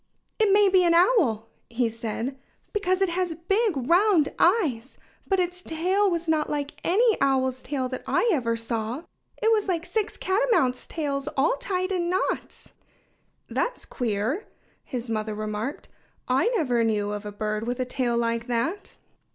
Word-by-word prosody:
"It 430 -2 +4
may 410 0 +6
be 375 -1 +4
an 340 -1 +4
owl," 320 - +3 0.2
he 235 0 +1
said, 230 +3 -4 0.4
"because 390 -2 +1
it 385 - +1
has 350 -1 -1
big, 390 +2 +1
round 355 -3 +4
eyes. 305 - +2 0.3
But 385 -1 +2
its 360 0 -1
tail 370 +5 +1
was 340 -1 -2
not 310 -1 +1
like 290 -1 -4
any 440 +5 +3
owl's 260 -2 +1
tail 265 -2 -2
that 255 - -5
I 480 - +2
ever 235 -6 0
saw. 230 +4 -3 0.4
It 445 - +4
was 430 -2 +2
like 345 -3 -1
six 435 +1 -2
catamounts' 380 - +1
tails, 285 -3 -3
all 270 +1 +3
tied 370 +4 -2
in 350 -2 0
knots." 370 +1 -2 0.8
"That's - - -2
queer!" 240 - -2 0.4
his 250 -2 -5
mother 215 -1 -2
remarked. 215 +5 -4 0.4
"I 260 - +2
never 250 - +2
knew 210 -2 0
of 210 0 -4
a 210 - -6
bird 215 +1 -3
with 245 +1 -2
a 255 - 0
tail 245 -1 -1
like 230 0 -1
that." 250 - -2
290 Hz, 160 wpm, -25 LUFS, 235-370 Hz, 0.8 s, may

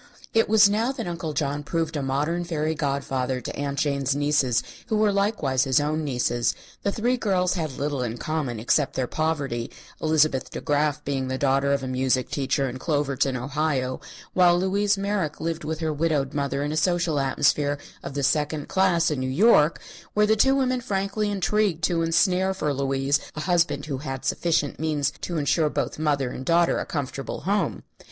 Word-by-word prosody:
It 225 -1 +3
was 210 -1 +7
now 220 +5 +1
that - - -5
Uncle 170 -3 -4
John 145 0 -1
proved 160 +1 -2
a 145 - -1
modern 145 +6 -1
fairy 160 -2 -1
godfather 135 -3 -1
to 125 - -6
Aunt 140 -1 -3
Jane's 140 -2 0
nieces 145 -5 +2 0.2
who 220 - 0
were 210 -1 +3
likewise 195 - +1
his 130 0 +3
own 155 +2 -1
nieces. 120 -3 0 0.3
The 200 - 0
three 240 +5 0
girls 185 -5 +1
had 155 -7 -3
little 145 -1 -2
in 120 -1 -3
common 140 -6 -3
except 135 +5 +1
their 130 - 0
poverty, 140 -5 -2 0.3
Elizabeth 155 -4 +2
De - - -6
Graf 145 -1 0
being 135 -2 -1
the 130 0 -2
daughter 140 +1 +2
of 140 -1 0
a - - -3
music 130 0 0
teacher, 135 0 0
in 130 0 -6
Cloverton, 140 -3 0
Ohio, 135 0 -1 0.3
while 175 -1 +5
Louise 200 +2 +1
Merrick 195 -6 -2
lived 165 0 -3
with 155 +1 -4
her 160 -1 0
widowed 150 -3 0
mother 140 -1 -1
in 145 - -2
a 155 - -2
social 170 -2 +1
atmosphere 145 +1 +1 0.2
of 140 - -7
the 140 - -1
second 150 +1 0
class 175 -4 +2
in 145 - -1
New 130 0 -2
York, 160 - +4 0.4
where 210 0 +4
the 215 +1 +3
two 265 +5 +4
women 255 -2 +1
frankly 200 -1 -1
intrigued 200 -3 0
to 170 +1 +2
ensnare 180 +3 +2
for 150 -6 -1
Louise 135 +1 +1 0.2
a 155 - -4
husband 175 0 +1
who 140 -4 -4
had 135 -2 -5
sufficient 155 -4 0
means 150 -3 0
to 175 - -3
ensure 150 +1 +2
both - - -3
mother 140 -5 0
and 130 - -6
daughter 170 +4 +3
a - - -4
comfortable 140 -2 -4
home. 200 +6 -1
150 Hz, 190 wpm, -25 LUFS, 135-175 Hz, 0.4 s, was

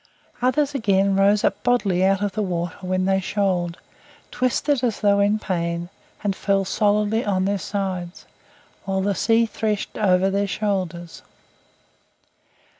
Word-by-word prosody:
Others, 285 +3 +1
again, 195 -6 +2
rose 200 +1 +3
up - - 0
bodily 200 -7 +1
out 195 +1 +2
of 205 - 0
the 215 +3 -3
water 175 -3 -2
when 185 0 -1
they 190 0 +2
shoaled, 185 -3 -1 0.5
twisted 255 +2 0
as 235 -4 -1
though 200 -1 +3
in 205 +1 +3
pain, 170 -3 -3 0.3
and 200 -2 0
fell 195 0 0
solidly 210 +3 +1
on 190 -2 0
their 200 0 0
sides, 185 -3 -4 0.6
while 190 0 -1
the 200 +1 +1
sea 225 +4 +2
threshed 215 -2 -3
over 190 -2 +3
their 200 +1 0
shoulders. 180 -4 -3
195 Hz, 140 wpm, -22 LUFS, 185-210 Hz, 0.6 s, rose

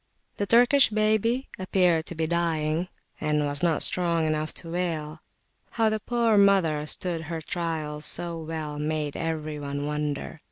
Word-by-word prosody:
The 205 - -1
Turkish 245 +5 +6
baby 220 +4 +1
appeared 180 -3 +2
to 175 - -6
be 160 0 0
dying, 165 0 0 0.3
and 150 -1 +1
was 145 0 -2
not 170 -3 +2
strong 170 -3 +1
enough 155 0 -1
to 165 - -7
wail. 160 -3 -3 0.5
How 225 -1 +3
the 215 0 -1
poor 230 -1 +2
mother 170 -7 +3
stood 170 0 -2
her 165 0 -4
trials 155 -2 -3
so 170 +2 0
well, 155 -2 -5
made 150 -1 -2
every 155 -2 -3
one 145 0 -4
wonder. 150 +1 -3
165 Hz, 155 wpm, -26 LUFS, 150-185 Hz, 0.5 s, Turkish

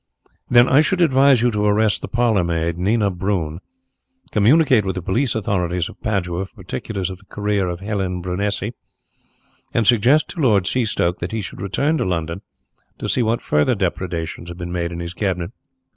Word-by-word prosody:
"Then 120 0 +6
I 135 +3 +5
should 180 +4 +1
advise 135 -6 +4
you 120 - +3
to 105 -1 -1
arrest 105 0 +2
the - - -5
parlourmaid, 85 -8 +1
Nina 100 +3 +1
Brun, 90 -4 -2 0.7
communicate 130 +2 +4
with 95 -1 -2
the 90 - -3
police 120 +9 0
authorities 90 -5 -1
of - - -15
Padua 95 -4 -2
for 120 - -33
particulars 95 -1 -4
of 95 - -9
the 100 - -22
career 105 -1 -1
of 90 +1 -4
Helene 95 -3 -2
Brunesi, 100 +4 -2 1.0
and 115 - +2
suggest 125 +8 +4
to 175 - -7
Lord 105 -8 +4
Seastoke 100 -6 0
that 85 - -4
he 110 - -1
should 90 - -8
return 140 - 0
to - - +1
London 85 0 -2 0.6
to - - -4
see - - +1
what 115 0 0
further 75 +12 +2
depredations 85 -3 -3
have 85 - -8
been 85 -1 -6
made 85 -1 -2
in 85 - -6
his 85 0 -5
cabinet." 90 -2 -2
100 Hz, 180 wpm, -20 LUFS, 90-115 Hz, 1.0 s, Then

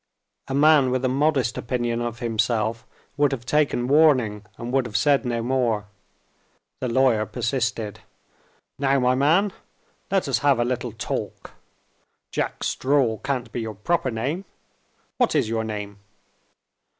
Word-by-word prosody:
A 135 - -3
man 145 -2 +5
with 130 +1 0
a - - +4
modest 135 -2 +1
opinion 120 -1 -2
of 120 -1 -3
himself 115 -1 -1 0.3
would 145 -1 +3
have 125 -3 -4
taken 145 -3 +1
warning, 130 -8 +3
and 120 +1 -6
would 135 -2 +2
have 105 -3 -2
said 140 +4 +3
no 120 -1 -1
more. 120 -4 0 0.9
The 130 - -2
lawyer 115 -3 +2
persisted. 120 -4 -2 0.8
"Now, 140 0 +2
my 125 0 +3
man! 165 +10 +3 0.6
let 195 -4 +1
us 135 - +1
have 140 -3 +3
a 120 - +2
little 125 -1 -2
talk. 110 - -5 0.8
'Jack - - -3
Straw' 130 -5 +1
can't 130 -4 -3
be 120 - -3
your 110 -1 -5
proper 160 - 0
name. 135 - -3 0.7
What 245 -9 +2
is 135 -7 +2
your 110 0 -1
name?" 105 -2 -6
125 Hz, 145 wpm, -24 LUFS, 115-140 Hz, 0.9 s, man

